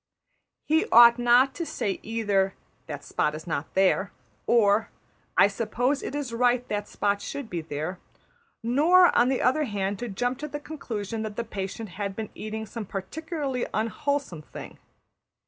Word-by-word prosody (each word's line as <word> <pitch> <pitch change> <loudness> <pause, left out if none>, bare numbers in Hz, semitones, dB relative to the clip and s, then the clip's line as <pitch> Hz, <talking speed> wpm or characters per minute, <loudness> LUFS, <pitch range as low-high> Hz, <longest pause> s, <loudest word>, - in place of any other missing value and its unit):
He 315 +1 +2
ought 235 +1 +8
not 245 +3 +5
to 340 - -4
say 205 - -3
either, 205 -4 0 0.3
``That 145 -2 -6
spot 150 +1 -1
is 155 - -8
not 155 -3 -4
there,'' 190 0 +3 0.4
or, 220 -2 +4 0.5
``I - - +7
suppose 245 +6 0
it - - -5
is 280 -5 -3
right 245 +1 +2
that 205 0 -2
spot 200 0 -1
should 280 -5 -6
be 170 -2 -2
there,'' 155 +4 -5 0.6
nor, 320 +10 +5
on 240 +1 +5
the 265 - 0
other 300 +4 +3
hand, 200 -3 -2
to 240 - -4
jump 245 +5 -2
to 300 - -4
the 295 0 -5
conclusion 230 -8 -5
that 215 -1 -5
that 230 0 -5
patient 200 +2 -5
had 195 +2 -4
been 220 -1 -5
eating 220 0 -5
some 220 -1 -7
particularly 275 - -3
unwholesome 230 - -1
thing. - - -10
225 Hz, 165 wpm, -26 LUFS, 200-260 Hz, 0.6 s, ought